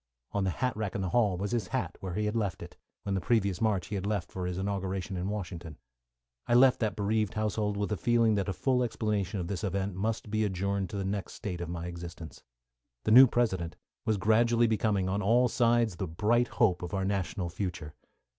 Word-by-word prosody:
On 100 -1 0
the - - +1
hat 125 +6 -1
rack 105 -3 -3
in 100 - -1
the 95 - -1
hall 105 -4 +2
was 100 +4 -3
his 115 -6 -1
hat, - - -2
where 95 -2 -5
he 105 - 0
had 105 +2 -1
left 100 -6 -1
it, - - -11 0.3
when 100 - -2
the 95 - 0
previous 100 -6 +1
March 105 -5 +1
he 100 - -2
left 100 -1 -2
for 90 -1 -3
his 90 0 -3
inauguration 95 0 -2
in 90 +2 -2
Washington. 90 -6 -5 0.7
I 120 - +3
left 130 +1 +6
that 110 -3 0
bereaved 105 -1 0
household 105 -1 -1
with 100 +1 -2
a 105 - 0
feeling 115 0 +3
that 100 -1 0
a - - +1
full 125 +7 +1
explanation 105 -4 -1
of 85 - -3
this 95 -1 -4
event 100 0 -1
must 105 +2 -3
be 110 0 +1
adjourned 100 -1 -1
to 100 - -5
the 100 - -2
next 100 0 -3
state 90 -5 -5
of 85 - -4
my 85 -1 -4
existence. 85 -1 -8 0.6
The - - 0
new 130 +4 +10
President 95 -9 0 0.3
was 110 -2 +1
gradually 115 +4 +3
becoming, 105 -4 +1
on 100 +2 0
all 120 +5 +4
sides, 115 -5 +2
the 95 - -3
bright 110 +9 +2
hope 100 -8 +2
of 90 +3 -4
our 95 0 0
national 95 -2 -2
future. 90 -5 -4
100 Hz, 220 wpm, -30 LUFS, 95-110 Hz, 0.7 s, new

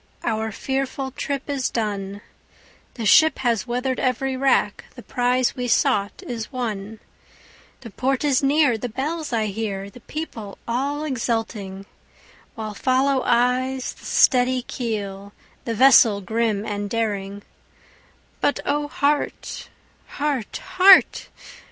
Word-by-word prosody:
our 220 -1 -1
fearful 265 +3 -3
trip 275 +1 -4
is 275 -3 -1
done, 205 -3 -3 0.7
The 230 - -4
ship 315 +9 +6
has 235 -4 0
weather'd 250 +2 -1
every 260 +1 0
rack, 270 +1 +1
the - - -11
prize 250 0 +1
we 250 -2 -3
sought 235 - +1
is 235 -6 -5
won, 220 -4 -4 0.8
The 230 -4 -10
port 265 +5 -1
is 280 -3 +2
near, 280 -4 +3
the 245 - -4
bells 300 +6 -3
I 225 -2 +1
hear, 200 -1 -4
the 245 - -13
people 230 -8 -7
all 280 +5 -1
exulting, 225 -7 -3 0.7
While 215 -2 -5
follow 260 +3 +1
eyes 250 +2 +1
the - - -17
steady 255 -1 +3
keel, 200 -5 -5 0.3
the 230 - -2
vessel 235 -4 +6
grim 220 0 -1
and 205 -1 -3
daring; 205 -3 -3 1.0
But 285 - +1
O 290 +1 0
heart! 290 0 -2 0.4
heart! 285 -6 -3 0.2
heart! 375 +1 +6
245 Hz, 125 wpm, -22 LUFS, 215-270 Hz, 1.0 s, ship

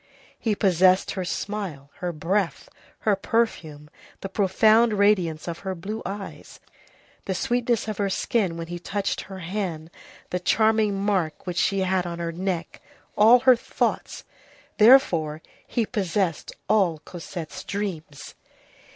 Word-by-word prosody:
He 220 -3 0
possessed 185 -1 +3
her 190 - -3
smile, 180 -7 -5
her 180 -1 -3
breath, 170 +4 -1 0.3
her 210 -2 +2
perfume, 175 -9 -2 0.3
the 195 - -5
profound 215 +4 +4
radiance 190 -7 +2
of 170 -1 -4
her 190 -1 -4
blue 210 +6 -5
eyes, 200 0 -8 0.7
the 190 - -2
sweetness 240 +2 0
of 215 -2 -4
her 200 -1 +1
skin 190 -3 0
when 165 - -5
he 175 +1 -6
touched 200 +3 -2
her 190 0 -9
hand, 175 -3 -4 0.4
the 180 - -1
charming 215 +1 +2
mark 190 -6 -1
which 180 -2 -4
she 195 -1 +1
had 185 -1 0
on 170 0 -5
her 170 -1 -3
neck, 175 0 -4 0.3
all 230 +4 +7
her 260 -1 +7
thoughts. 230 - -2 0.6
Therefore, 170 - +5 0.2
he 235 - 0
possessed 190 -6 -1 0.2
all 190 -7 +3
Cosette's 175 0 -7
dreams. 175 -8 -5
190 Hz, 135 wpm, -24 LUFS, 170-210 Hz, 0.7 s, all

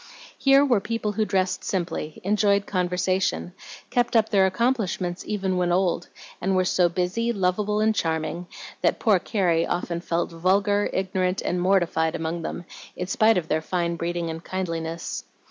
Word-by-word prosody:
Here 275 +1 +5
were 245 -6 +3
people 220 +1 -2
who 215 +1 0
dressed 190 -2 0
simply, 170 -4 -3
enjoyed 200 0 +2
conversation, 185 0 0 0.4
kept 245 -1 +1
up 220 -1 +4
their 195 -2 +4
accomplishments 190 -4 -1
even 190 -3 -1
when 175 -1 +1
old, 175 -1 +1 0.3
and 190 +1 +1
were 185 0 +2
so 180 -1 +3
busy, 185 +7 -1
lovable, 205 +1 0
and 220 0 +3
charming, 165 -1 -2 0.3
that - - +2
poor 210 -6 +4
Carrie 175 -5 +1
often 170 -1 -2
felt 170 0 -1
vulgar, 200 +4 +2
ignorant, 185 0 -1
and 175 0 -1
mortified 175 -4 +2
among 165 +1 -3
them, 175 +1 -5 0.3
in 180 - -3
spite 215 +3 +3
of 170 -3 -2
their 160 - 0
fine 170 0 -1
breeding 170 0 -2
and 165 +1 -7
kindliness. 165 -3 -4
185 Hz, 160 wpm, -25 LUFS, 175-205 Hz, 0.4 s, Here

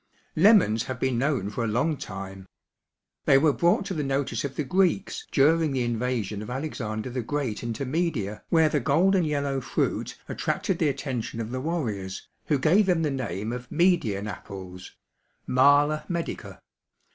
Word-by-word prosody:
Lemons 155 - +5
have 130 -1 -5
been 130 -3 0
known 130 -7 0
for 115 - -3
a - - 0
long 125 +9 +1
time. 95 -5 -8 0.8
They 135 - +6
were 145 +1 +4
brought 175 +5 +2
to 195 - -3
the 155 - -2
notice 135 0 -1
of 140 -2 -4
the 150 - -1
Greeks 185 +6 0
during 155 +1 +3
the 130 -2 0
invasion 115 -3 -2
of 105 - -7
Alexander 125 -4 -4
the 125 0 -2
Great 130 -3 -3
into 120 +3 -3
Media 130 - -2
where 160 -2 +4
the 150 -1 +1
golden 170 +8 +3
yellow 140 -3 -1
fruit 125 - -2
attracted 185 - -2
the 155 - +3
attention 130 -4 -4
of 115 0 -4
the 130 0 -3
warriors 110 - -3 0.2
who 150 - +2
gave 180 +9 +3
them 175 -3 +2
the 150 - 0
name 115 -4 -3
of 125 0 -7
Median 155 - +2
apples 95 -2 -9 0.5
(Mala 145 +4 +4
medica). 170 -2 -4
135 Hz, 165 wpm, -26 LUFS, 115-155 Hz, 0.8 s, They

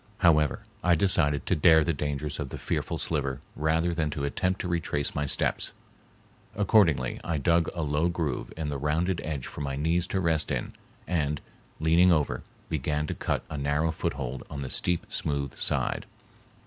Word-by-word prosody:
However, 75 -6 +3 0.2
I 85 -1 +5
decided 75 -5 +2
to - - +2
dare 80 0 +6
the 85 - 0
dangers 75 +1 -3
of 70 -3 -3
the - - -6
fearful - - -2
sliver 70 -4 -1 0.2
rather 80 +3 +1
than 80 -2 0
to 75 -1 -4
attempt 90 +7 0
to - - -3
retrace 85 -4 -1
my 75 0 -1
steps. - - +1 0.8
Accordingly 95 - +3
I 85 -2 -1
dug 85 +3 +2
a 85 - -1
low 75 +3 +1
groove 80 -7 -2
in 80 -2 -2
the 70 -1 -3
rounded 80 +5 0
edge 75 -5 -3
for - - -7
my 70 -1 -2
knees 85 +5 +1
to 95 - -1
rest 80 -4 +1
in - - -2 0.3
and, 75 -4 0 0.4
leaning 85 +3 +5
over, 75 -4 +1 0.3
began 75 0 -1
to - - -3
cut - - -2
a 75 - -5
narrow 75 +3 +1
foothold 65 -4 -3
on 70 -1 -5
the 65 - -6
steep, 90 -1 +2
smooth 70 -2 -2
side. - - 0
75 Hz, 175 wpm, -28 LUFS, 70-85 Hz, 0.8 s, dare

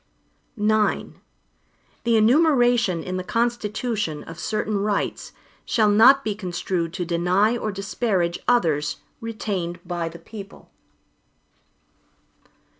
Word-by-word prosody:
IX 210 -1 +1 1.0
The 230 -1 +4
enumeration 240 - +3
in 185 0 -4
the 185 - -3
Constitution, 220 - -2
of 165 +1 -10
certain 215 +2 -1
rights, 205 0 -2 0.3
shall 215 -2 +2
not 260 +6 +6
be 215 - -1
construed 180 -3 -3
to 180 -2 -3
deny 180 +6 +2
or 220 -3 -2
disparage 195 -3 -1
others 155 -11 +2 0.2
retained 200 -6 -4
by 175 -1 -3
the 170 - -11
people. 200 +3 -12
205 Hz, 105 wpm, -23 LUFS, 175-225 Hz, 1.0 s, not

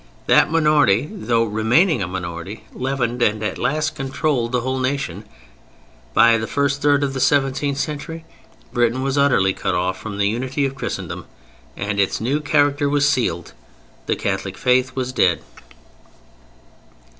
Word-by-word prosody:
That - - +4
minority, 150 -7 +3
though 120 - +1
remaining 115 - +2
a 90 - -1
minority, 90 +2 -6
leavened 125 -2 -2
and 110 -2 +1
at 105 - -3
last 155 +5 0
controlled 135 -3 -1
the 125 -1 +1
whole 130 +1 -2
nation: 130 -7 -2 0.9
by 115 -1 +6
the 110 - -3
first 140 +2 0
third 145 -1 +3
of 135 -1 -1
the 135 - -3
seventeenth 135 +1 +1
century 155 +2 -4 0.5
Britain 120 +2 +1
was 135 0 -1
utterly 110 -9 +3
cut 95 -1 -2
off 95 +1 -1
from 105 -2 -6
the 100 0 +2
unity 130 +6 -1
of 135 - -2
Christendom 135 - -5 0.5
and 100 +1 -2
its 100 - +1
new 130 +7 0
character 145 -1 +2
was 145 0 +2
sealed. 120 - -1 0.5
The - - +1
Catholic - - -3
Faith 130 +1 +2
was 130 -1 -3
dead. 85 -9 +2
130 Hz, 150 wpm, -20 LUFS, 110-145 Hz, 0.9 s, by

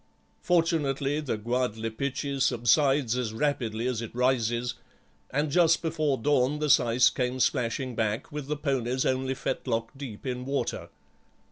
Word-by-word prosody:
Fortunately 150 -5 +1
the 140 -7 -2
Gwadlipichee 125 +4 -2
subsides 130 +1 +3
as 120 -4 -2
rapidly 120 -4 -1
as 125 -3 -1
it 115 0 -7
rises, 120 -1 +1 0.6
and 145 +2 -1
just 165 0 +4
before 155 -4 0
dawn 140 +2 +2
the 150 -1 +1
syce 120 0 +5
came 125 0 -2
splashing 125 0 0
back, 110 +4 -2
with 150 -2 -5
the 150 0 -2
ponies 130 -3 -1
only 130 0 0
fetlock 115 -3 -3
deep 135 -6 -8
in 125 -1 -3
water. 135 -2 -3
130 Hz, 135 wpm, -27 LUFS, 120-145 Hz, 0.6 s, syce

